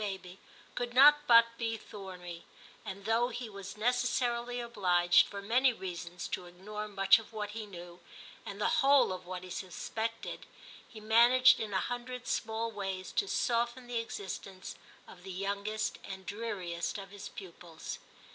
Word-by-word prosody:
baby 190 -2 -5 0.3
could 245 0 -4
not 295 +3 +7
but 230 -1 +9
be 225 -1 -1
thorny, 180 -5 -9 0.4
and 195 +1 -7
though 225 +2 +3
he 245 0 -5
was 200 -1 -9
necessarily 245 +1 0
obliged, 180 -7 +4
for 200 0 -7
many 250 +5 +4
reasons, 180 -4 -6
to 180 - -4
Ignore 210 +4 -6
much 195 0 +5
of 225 - -12
what 210 -1 -4
he 215 0 -6
knew, 175 -2 -10 0.4
and - - -7
the - - +2
whole 275 -7 +5
of 185 -1 -8
what 180 0 -5
he 185 - -9
suspected, 220 +5 -4 0.4
he 220 - -11
managed 240 +3 +6
in 215 -2 -3
a 190 - +1
hundred 245 0 -5
small 225 0 -1
ways 195 -3 -4
to 400 - 0
soften 240 -4 0
the 240 -1 -2
existence 195 -3 -6 0.3
of 180 - -13
the 190 - -10
youngest 200 +3 -2
and 190 -1 -8
dreariest 200 -5 -3
of 195 -1 -8
his 200 0 -8
pupils. 170 -3 -9
210 Hz, 155 wpm, -32 LUFS, 190-235 Hz, 0.4 s, but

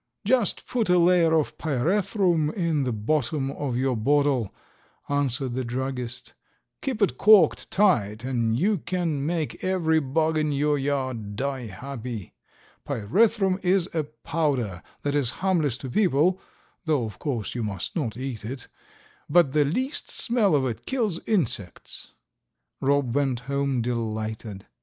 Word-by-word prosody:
"Just 235 -2 +1
put 230 -6 -1
a 180 - +5
layer 175 -1 +4
of 155 -1 0
pyrethrum 170 - +1
in 165 -7 0
the 125 - 0
bottom 135 +5 -1
of 135 -4 -3
your 130 0 +1
bottle," 135 -1 +2 0.6
answered 135 -2 0
the 130 +1 -2
druggist, 125 0 -4 0.5
"keep 255 -7 -1
it 200 - 0
corked 205 -7 +5
tight, 115 - +2
and 120 -3 0
you 200 +3 +2
can 170 -4 -2
make 160 0 -2
every 170 -4 +2
bug 155 +3 +1
in 155 -1 0
your 145 +1 +1
yard 130 -7 -2
die 135 0 -3
happy. 115 -1 -7 0.5
Pyrethrum 195 - +2
is 185 0 +2
a 160 -2 0
powder 145 - -2 0.2
that 145 - 0
is 140 -5 +2 0.2
harmless 155 -10 +2
to 130 - -7
people 180 - +2 0.4
(though 150 -6 +1
of 105 -3 -8
course 120 -8 -3
you 120 - -3
must 100 -4 -4
not 120 - -2
eat 130 -5 -5
it), 125 +4 -6 0.6
but 170 -6 +5
the 150 0 +3
least 255 - 0
smell 225 -8 +2
of 135 -2 +2
it 120 -4 -4
kills 220 -10 0
insects." 120 - -2 0.7
Rob 140 -3 +1
went 135 -3 0
home 140 -1 -1
delighted. 110 -3 -4
140 Hz, 145 wpm, -25 LUFS, 125-170 Hz, 0.7 s, a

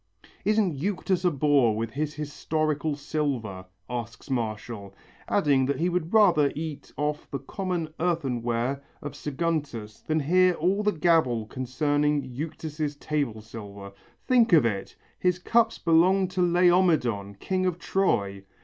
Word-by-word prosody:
"Isn't 210 -5 +2
Euctus 185 +1 -1
a - - +6
bore 140 -7 +3
with 115 0 -3
his 150 +3 -3
historical 150 0 -1
silver?" 130 -11 -3 0.2
asks 120 +2 -6
Martial, 110 -4 -4 0.3
adding 140 -9 +2
that 140 -1 0
he 175 +2 +2
would 175 -1 -2
rather 175 -10 +5
eat 155 -1 -6
off 150 +1 -2
the 140 - -3
common 175 +4 -3
earthenware 130 -6 -1 0.2
of 145 -1 -6
Saguntus 145 -8 -3
than 155 0 0
hear 180 +5 +4
all 185 +5 +1
the 210 0 +2
gabble 155 - +2
concerning 145 +4 0
Euctus' 150 +2 -5
table 140 -8 -2
silver. 100 -3 -9 0.4
"Think 235 -5 +4
of 155 -7 +6
it! 100 -4 -2 0.2
His 180 -1 +2
cups 225 +5 +2
belonged 180 +3 +3
to 185 0 -1
Laomedon, 170 - +3
king 185 - -1
of 175 -2 -1
Troy. 100 - 0
150 Hz, 135 wpm, -26 LUFS, 125-175 Hz, 0.4 s, a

